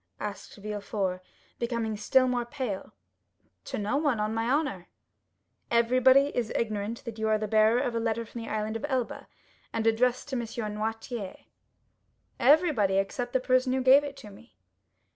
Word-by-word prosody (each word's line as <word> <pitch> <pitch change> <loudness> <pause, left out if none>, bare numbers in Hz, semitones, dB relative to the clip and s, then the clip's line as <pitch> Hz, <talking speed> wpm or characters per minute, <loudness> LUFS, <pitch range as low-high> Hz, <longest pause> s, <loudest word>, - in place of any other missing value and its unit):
asked 205 -1 -6
Villefort, 200 -2 -3 0.4
becoming 235 -2 -2
still 255 +5 +3
more 245 -1 0
pale. 240 -6 -5 0.7
"To - - -4
no 210 +6 0
one, 290 -7 +1
on 210 +1 -1
my 225 +1 -1
honor." 270 - 0 0.8
"Everybody 255 +4 +4
is 235 -3 -1
ignorant 215 0 -2
that 225 -2 -7
you 220 - 0
are 215 0 +3
the 215 0 -3
bearer 220 +2 +4
of 250 -3 -1
a 230 - 0
letter 230 0 -1
from 230 +1 -8
the 230 - -7
Island 215 0 -2
of 225 - -3
Elba, 255 -3 -2 0.4
and 225 0 -2
addressed 240 +4 +2
to 265 - -3
M. - - 0 0.3
Noirtier?" 220 -1 -4 1.0
"Everybody, 275 - +4
except 245 +5 -2
the 260 - +3
person 255 0 +2
who 260 0 0
gave 270 +3 +7
it 280 -1 -6
to 210 - -11
me." 235 +5 -17
230 Hz, 165 wpm, -28 LUFS, 215-255 Hz, 1.0 s, gave